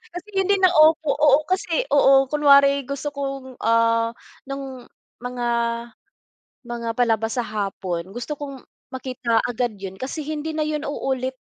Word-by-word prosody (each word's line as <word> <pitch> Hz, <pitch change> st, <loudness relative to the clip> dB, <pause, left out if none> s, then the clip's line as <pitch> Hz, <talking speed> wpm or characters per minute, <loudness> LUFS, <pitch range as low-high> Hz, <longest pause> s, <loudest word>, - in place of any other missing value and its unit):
Kasi 355 Hz, +3 st, -7 dB
hindi 390 Hz, +1 st, +3 dB
na 370 Hz, -, +6 dB
opo 310 Hz, -2 st, +4 dB
oo, 295 Hz, -1 st, +5 dB
kasi 370 Hz, 0 st, 0 dB
oo, 270 Hz, -2 st, +5 dB
kunwari 280 Hz, -2 st, +5 dB
gusto 280 Hz, +1 st, -3 dB
kong, 275 Hz, -2 st, -6 dB
ah, 230 Hz, 0 st, +2 dB, 0.3 s
nung 270 Hz, -2 st, -7 dB, 0.4 s
mga 245 Hz, -1 st, -3 dB, 1.2 s
mga 235 Hz, -1 st, -4 dB
palabas 225 Hz, -1 st, +1 dB
sa 240 Hz, -, 0 dB
hapon, 190 Hz, -4 st, -4 dB
gusto 240 Hz, +8 st, -5 dB
kong 275 Hz, -3 st, -7 dB, 0.3 s
makita 255 Hz, -3 st, -2 dB
agad 240 Hz, -3 st, -2 dB
yun 190 Hz, -1 st, -7 dB
kasi 285 Hz, +3 st, -4 dB
hindi 310 Hz, +1 st, -4 dB
na 310 Hz, -1 st, -1 dB
yun 305 Hz, -1 st, -2 dB
uulit 260 Hz, -2 st, -3 dB
265 Hz, 140 wpm, -22 LUFS, 235-290 Hz, 1.2 s, na